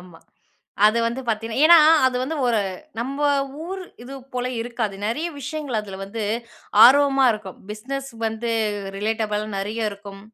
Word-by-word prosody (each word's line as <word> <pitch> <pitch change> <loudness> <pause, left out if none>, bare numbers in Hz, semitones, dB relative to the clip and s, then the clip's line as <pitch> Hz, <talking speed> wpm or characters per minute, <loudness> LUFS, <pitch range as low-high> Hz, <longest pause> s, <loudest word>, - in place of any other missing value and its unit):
ஆமா. 175 -2 -15 0.7
அது 215 +2 +3
வந்து 235 +3 -2
பார்த்தீங்கன்னா 225 +2 -2
ஏனா, 340 +1 +9 0.3
அது 255 -1 0
வந்து 310 +5 -3
ஒரு 235 -2 +2 0.4
நம்ம 270 +5 -4 0.4
ஊரு 375 +2 -6 0.2
இது 260 +3 -9 0.2
போல 250 0 -1
இருக்காது. 230 -3 -3
நெறைய 300 +10 -2
விஷயங்கள் 290 -4 -3
அதுல 195 -2 -9
வந்து 215 +3 -6 0.6
ஆர்வமா 275 +1 +6
இருக்கும். 210 -4 -8
பிஸ்னஸ் 270 +6 -5 0.2
வந்து 225 +1 -3 0.5
ரிலேட்டபள் 215 0 -1
நெறைய 215 +2 -2
இருக்கும். 200 -1 -11
230 Hz, 140 wpm, -22 LUFS, 210-270 Hz, 0.7 s, ஏனா